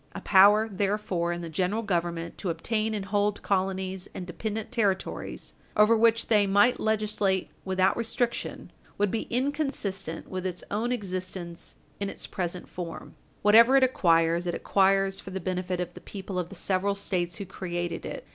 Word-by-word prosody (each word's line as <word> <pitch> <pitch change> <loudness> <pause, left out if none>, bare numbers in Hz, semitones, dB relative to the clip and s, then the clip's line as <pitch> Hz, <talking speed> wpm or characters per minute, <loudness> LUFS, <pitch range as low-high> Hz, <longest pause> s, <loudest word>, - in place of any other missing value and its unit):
A - - -5
power, 205 +3 +6
therefore, 195 -4 -1
in 175 0 -3
the - - -4
General 185 +7 -1
Government 170 -4 -2
to 190 - -2
obtain 215 +6 -1
and 200 -2 -3
hold 205 0 0
colonies 190 -1 -1
and 180 - -5
dependent 215 +5 -4
territories 205 -6 -2 0.2
over 210 +2 +6
which 230 0 +3
they 210 -3 +3
might 205 +6 +4
legislate 210 -3 0
without 190 0 +2
restriction 235 +1 -2 0.3
would 205 -1 +1
be 225 - -2
inconsistent 245 - -2
with 185 -1 -4
its 180 -1 -4
own 225 +4 0
existence 185 -5 -5 0.2
in 200 -1 -2
its - - -7
present 180 -1 -4
form. 170 -2 -7 0.3
Whatever 230 +5 +7
it 265 - +5
acquires, 170 -7 +3
it 175 - -1
acquires 195 0 +2
for - - -9
the 190 0 -4
benefit 180 0 -2
of 175 0 -3
the - - -11
people 195 -2 -5
of 175 -1 -3
the 195 - -10
several 195 +2 0
States 175 -3 -1
who 200 - -5
created 175 -2 -4
it. - - -6
195 Hz, 165 wpm, -27 LUFS, 180-215 Hz, 0.3 s, Whatever